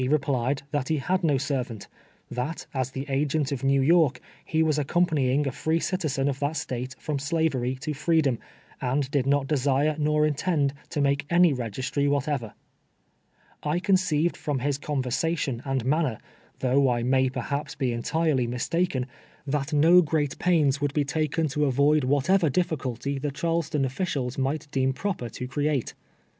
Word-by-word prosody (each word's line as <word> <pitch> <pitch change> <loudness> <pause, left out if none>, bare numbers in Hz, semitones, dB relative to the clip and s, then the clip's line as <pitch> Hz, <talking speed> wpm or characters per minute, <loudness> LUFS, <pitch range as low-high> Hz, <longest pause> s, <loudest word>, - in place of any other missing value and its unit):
replied 135 -2 0
that 145 -4 -1
he 160 - +1
had 185 +6 0
no 150 -4 +3
servant 130 -6 -3 0.2
— - - -36
that, 155 +6 -4
as 130 -2 -1
the 135 +1 -5
agent 145 +1 0
of 140 -1 -3
New 135 0 +3
York, 155 -4 +4 0.2
he 160 0 +1
was 155 -1 +1
accompanying 145 -3 +1
a 135 - -1
free 160 +5 0
citizen 155 -7 -1
of 135 -1 -1
that 145 +2 -1
State 130 -3 -4
from 150 -2 -3
shivery 140 -4 0
to 145 +4 -4
freedom, 150 -4 +1 0.4
and 135 +1 -1
did 135 -2 +1
not 140 0 +2
desire 145 +1 +1
nor 150 0 +2
intend 150 -2 +1 0.2
to - - -3
make 140 0 +1
any 175 -2 +5
registry 130 +4 -2
whatever, 140 -6 -1 1.1
1 150 +4 -1
conceived 180 -4 +2
from 145 -2 -2
his 140 +2 -1
conversation 140 -1 -1
and 135 -3 -1
manner, 145 -4 +1 0.4
th(nigh 130 0 +3
I 120 - -2
may 130 +1 +3
per 130 -1 -4
liaps 140 +2 -4
he 130 -2 +1
entirely 135 +1 0
mistaken, 130 +3 -1 0.4
that 145 +1 -2
no 165 +4 +6
great 150 -4 -1
j^ains 150 -6 +2
would 145 +1 -1
be 145 -2 +2
taken 155 +2 0
to 150 +2 0
avoid 140 +2 +3
whatever 155 +6 +3
difficulty 140 -4 -2
the 145 +2 -2
Charleston 155 -1 -1
officials 135 -3 -2
might 140 +3 -2
deem 130 0 +1
projjcr 155 - -3
to 125 - -5
create. 145 -1 -1
140 Hz, 165 wpm, -26 LUFS, 130-155 Hz, 1.1 s, no